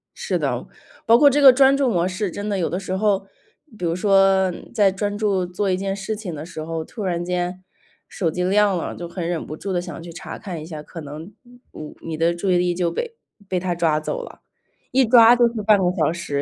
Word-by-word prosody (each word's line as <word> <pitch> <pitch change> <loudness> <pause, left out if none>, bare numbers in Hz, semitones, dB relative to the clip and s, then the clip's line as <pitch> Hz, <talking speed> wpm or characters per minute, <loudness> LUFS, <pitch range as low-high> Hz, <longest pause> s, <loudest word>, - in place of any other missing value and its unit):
是 - - -2
的， - - -2 0.4
包 230 0 +6
括 285 +3 +7
这 290 +2 +1
个 270 -2 +10
专 270 +1 +5
注 275 -2 +2
模 175 -3 +1
式 190 +1 -3
真 205 +4 -5
的 205 -2 -1
有 175 - -1
的 180 - -2
时 185 -1 -4
候， 195 -1 +1 0.5
比 180 - -9
如 165 - 0
说， 195 0 +4 0.2
在 205 -2 +4
专 205 +1 -3
注 200 -4 0
做 180 +3 -2
一 185 - +2
件 195 +1 -2
事 200 +2 -4
情 205 -5 -6
的 155 0 -7
时 160 -2 -7
候， 165 0 -4
突 215 - -7
然 175 -2 -1
间 180 +1 -3 0.5
手 170 -4 -2
机 180 - -3
亮 200 +1 +3
了， 170 - -4
就 175 -1 -7
很 170 -1 -4
忍 175 -2 -3
不 155 - -7
住 195 +2 -4
地 175 - 0
想 175 -3 -8
去 170 0 -9
查 180 - -8
看 180 -5 -6
一 - - -8
下。 155 -2 -7
可 165 +2 -10
能， 155 +6 -9
你 245 - -21 0.2
你 155 - -9
你 160 -1 -5
的 165 +2 +2
注 175 +3 -3
意 180 - +4
力 175 0 +1
就 175 -1 0
被 465 - -4 0.3
被 185 - 0
它 175 -1 -2
抓 165 -3 +1
走 - - -4
了， - - -12 0.5
一 260 0 +4
抓 235 0 +7
就 240 0 +4
是 220 - -3
半 210 0 +5
个 190 - 0
小 160 -1 +2
时， 145 -4 -3
185 Hz, 265 characters per minute, -22 LUFS, 170-210 Hz, 0.5 s, 个